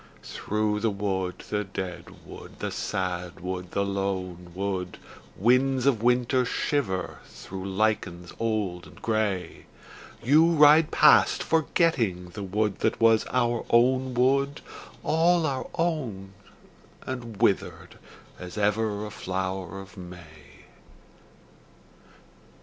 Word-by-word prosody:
Through 105 0 -2
the 115 +1 +1
wood, 95 -2 -3
the 105 0 0
dead 95 -3 -7
wood, - - -11
the - - -4
sad 90 -2 -3
wood, 90 0 -5
the 100 +2 -1
lone 95 -3 -3
wood, 95 -2 -3 0.4
Winds 130 +4 +3
of 130 -6 +2
winter 125 +2 +2
shiver 120 -6 -2
through 95 0 -8
lichens 95 -4 -1
old 105 -6 -2
and - - -16
grey, 110 -5 -2 0.6
You 155 +7 +5
ride 150 0 +6
past - - +5
forgetting 140 - +1
the 100 - -8
wood 100 +1 -1
that - - 0
was 115 -1 +4
our 120 -2 0
own 130 +2 +3
wood, 140 +3 +2 0.4
All 165 +1 +3
our 135 -4 -2
own 125 - -2 0.7
and 120 -4 -6
withered 110 -4 0 0.4
as 90 +3 -8
ever 105 0 0
a 105 - -7
flower 95 -1 -4
of 95 0 -12
May. 90 -4 -13
105 Hz, 115 wpm, -26 LUFS, 95-125 Hz, 0.7 s, ride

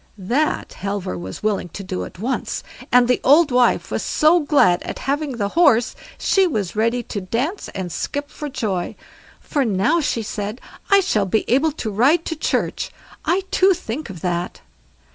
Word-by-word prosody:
That 245 +11 -1
Halvor 195 - -3
was 95 - -7
willing 205 -4 0
to 200 - -6
do 90 - -4
at - - -12
once; 240 +8 -3 0.3
and 250 -1 +5
the 250 - +2
old 295 +2 +5
wife 245 -1 +2
was - - -1
so 315 +3 +3
glad 285 - +3
at - - -6
having 285 +1 -1
the 200 -2 -1
horse, 265 -6 +3 0.2
she 385 -1 +3
was 210 - -2
ready 230 +3 +1
to 205 - -5
dance 250 - -2
and 185 -3 -4
skip 285 - -4
for 295 - -6
joy. 215 -10 -2 0.4
"For 285 -3 -1
now", 225 - +2
she 235 -5 -1
said, 210 +2 -4 0.3
"I 395 0 +6
shall 215 - +1
be 215 +4 0
able 275 +6 +3
to 225 -8 -4
ride 280 - +3
to 325 - -3
church. 305 - -1 0.4
I 355 +4 +1
too, 380 0 +4
think 300 -5 -5
of 175 -5 -9
that." 175 -1 -2
240 Hz, 180 wpm, -21 LUFS, 200-300 Hz, 0.4 s, I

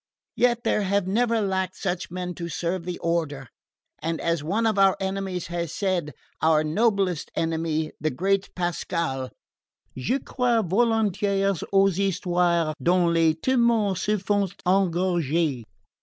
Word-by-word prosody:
Yet 240 -1 +2
there - - +1
have 200 -1 +1
never 230 +3 +1
lacked 190 -2 -1
such 180 -2 -3
men 180 0 -4
to 170 -1 -6
serve 170 +1 -3
the 180 -1 -4
Order; 155 -6 -1 0.5
and 165 0 -2
as 165 -3 -1
one 205 +9 0
of 220 -3 +1
our 195 -1 +5
enemies 190 -2 -3
has 170 -2 -2
said 180 -7 -1 0.3
our 155 -1 +4
noblest 195 0 +1
enemy, 160 -1 -1
the 155 - +1
great 190 +7 0
Pascal 170 -6 -2 0.7
'je 130 - 0
crois 245 -4 0
volontiers 200 -2 +1
aux 195 0 +4
histoires 175 -4 +1
dont 175 -1 +3
les 165 -1 +3
temoins 235 -1 +2
se 210 +4 0
font 200 -1 0
egorger.'" 170 -6 +1
180 Hz, 135 wpm, -25 LUFS, 165-200 Hz, 0.7 s, our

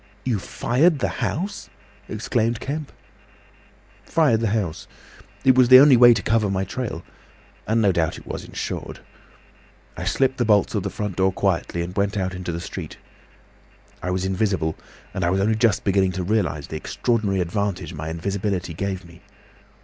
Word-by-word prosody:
"You 120 -5 0
fired 145 - +1
the - - 0
house!" 190 +6 -3 0.4
exclaimed 115 0 -1
Kemp. 150 +1 -5 1.1
"Fired 150 -9 +2
the 115 - 0
house. 100 -6 -2 0.6
It 130 -1 +6
was 125 -1 +4
the 130 - +11
only 140 -1 +8
way 120 -1 +8
to 100 - -2
cover 110 -2 +2
my 95 0 0
trail—and 110 +1 -6
no 100 - +4
doubt 85 -2 0
it - - -13
was - - -6
insured. - - -6 0.9
I 90 - -5
slipped 130 +7 +1
the - - +3
bolts 105 -3 +3
of - - 0
the - - -3
front 105 -3 -5
door 95 0 +3
quietly 90 -2 -1
and 90 +2 -7
went 100 0 0
out 95 -1 -1
into 90 -1 -4
the 85 - -4
street. 85 - -7 1.0
I 90 - -3
was 90 +1 -1
invisible, 95 -4 0 0.4
and 95 - -2
I 85 - +2
was 95 +2 +1
only 105 +3 +2
just 110 -2 +2
beginning 95 -2 +2
to 90 0 -3
realise 90 -7 0
the 80 - -6
extraordinary 105 +2 -1
advantage 95 +1 -2
my 80 0 -5
invisibility 95 +1 -2
gave 95 +1 -4
me. 85 0 -16
100 Hz, 170 wpm, -23 LUFS, 90-115 Hz, 1.1 s, the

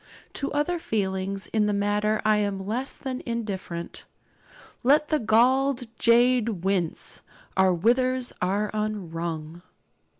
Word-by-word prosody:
To 280 - -3
other 295 +4 0
feelings 195 -5 -2
in 215 -2 +3
the 210 - +1
matter 210 +1 +1
I 215 0 +4
am 200 -2 -1
less 245 +6 -2
than 260 -2 -5
indifferent. 200 -7 -5 0.8
'Let 295 +4 +4
the 305 - +2
galled 255 +4 +3 0.2
jade 235 -5 +3
wince, 185 -4 -1 0.3
our 190 -1 +4
withers 245 +7 +1
are 200 +3 0
unwrung.' 170 -6 -4
215 Hz, 120 wpm, -26 LUFS, 190-250 Hz, 0.8 s, I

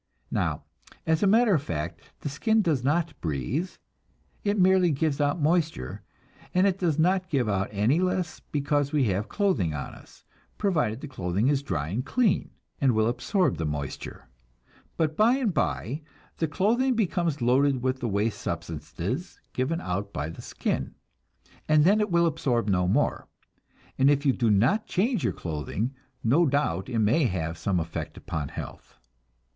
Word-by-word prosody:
Now, - - -1 0.4
as 160 0 +2
a 200 - +4
matter 225 +1 +5
of 155 - +2
fact, 80 - -4 0.2
the - - -3
skin 220 +10 +2
does 150 -8 +1
not 160 +4 +1
breathe, 85 - -2 0.7
it 205 0 +1
merely 185 -1 +5
gives 150 0 0
out 145 +4 +1
moisture, 160 - 0 0.5
and 185 +2 +5
it 195 -1 +1
does 165 -5 +1
not 185 +3 +2
give 135 -8 +1
out 100 -2 0
any 110 +10 +2
less 180 -3 -1
because 145 0 0
we 150 -3 +2
have 100 +2 -1
clothing 120 - +1
on 70 - -5
us, - - -16 0.3
provided 150 - 0
the - - -6
clothing 100 -2 0
is 140 -2 +2
dry 75 - -3
and 110 +8 -2
clean, 225 - +1 0.3
and 135 -3 +3
will 110 0 +3
absorb 130 - 0
moisture. 75 -3 -4 0.7
But 155 -2 0
bye 225 +7 +4
and 245 -8 0
bye 145 -2 -1 0.4
the 160 - 0
clothing 235 - +2
becomes 175 -7 0
loaded 130 +1 +2
with 130 0 0
the 120 - -2
waste 105 +2 -1
substances - - -4
given 140 +6 -1
out 100 - -3
by 75 -1 -3
the - - -10
skin, - - -3 0.7
and 155 -1 +5
then 205 +4 +5
it 210 - 0
will 170 -1 +3
absorb 125 -8 0
no 90 -2 +2
more, 130 +11 +1 0.7
and 135 +1 +6
if 145 0 +2
you 135 - +4
do 120 -3 +1
not 120 - +3
change 210 - 0
your 120 - +1
clothing, 85 - -3 0.3
no 150 +9 +4
doubt 130 - 0
it 120 - -2
may 115 +8 +3
have 85 -6 -2
some 90 +3 0
effect 80 0 -5
upon 80 -3 -4
health. - - -9
140 Hz, 165 wpm, -27 LUFS, 105-175 Hz, 0.7 s, and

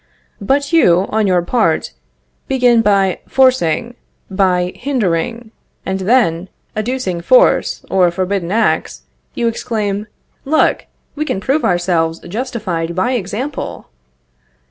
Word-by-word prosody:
But 280 +8 0
you, 185 - +4
on 215 -1 +1
your 180 -2 +2
part, 175 - 0 0.6
begin 245 -3 +3
by 195 -3 +2
forcing, 245 -5 +2 0.4
by 180 -2 +1
hindering, 230 -3 -2 0.3
and 190 0 -2
then, 190 -4 +1 0.3
adducing 215 -5 -2
forced - - +3
or 185 -2 +3
forbidden 185 0 -2
acts, 220 +1 0 0.3
you 235 - 0
exclaim: 215 -3 -2 0.4
"Look; 310 +3 +1 0.3
we 305 - -1
can 305 - -2
prove 275 +9 0
ourselves 175 -2 +1
justified 185 -6 -4
by 185 +7 0
example!" 245 +5 -4
205 Hz, 110 wpm, -16 LUFS, 180-250 Hz, 0.6 s, you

